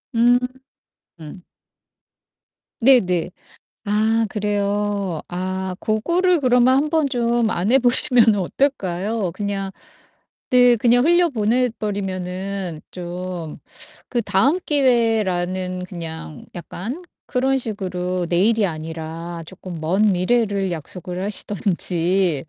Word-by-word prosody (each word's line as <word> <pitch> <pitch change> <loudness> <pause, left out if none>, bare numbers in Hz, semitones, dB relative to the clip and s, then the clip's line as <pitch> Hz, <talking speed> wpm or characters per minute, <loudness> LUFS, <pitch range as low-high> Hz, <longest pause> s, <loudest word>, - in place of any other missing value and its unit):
음. 240 +1 +5 0.8
음. 160 +4 -10 1.4
네네. 195 -10 +3 0.5
아 220 +2 +2
그래요. 205 -3 -1
아 185 +1 -3
고거를 340 - +1
그러면 250 0 +4
한번 300 +2 +1
좀 240 -3 +1
안 210 0 0
해 270 - +6
보시면은 240 -3 +4
어떨까요? 195 -2 -1
그냥 200 -2 -3 0.8
네 245 -1 +5
그냥 245 +2 +3
흘려보내 255 -8 +2
버리면은 190 -3 -4
좀 175 -2 -6 0.5
그 240 -2 -1
'다음 245 - +2
기회.'라는 190 - +1
그냥 165 -5 -8
약간 215 - -6 0.2
그런 265 +1 +1
식으로 185 -6 -2
내일이 210 +5 +3
아니라 165 0 -5
조끔 180 0 -9
먼 180 +6 0
미래를 200 0 +1
약속을 180 +3 -6
하시든지 185 -5 +1
200 Hz, 205 characters per minute, -21 LUFS, 180-240 Hz, 1.4 s, 해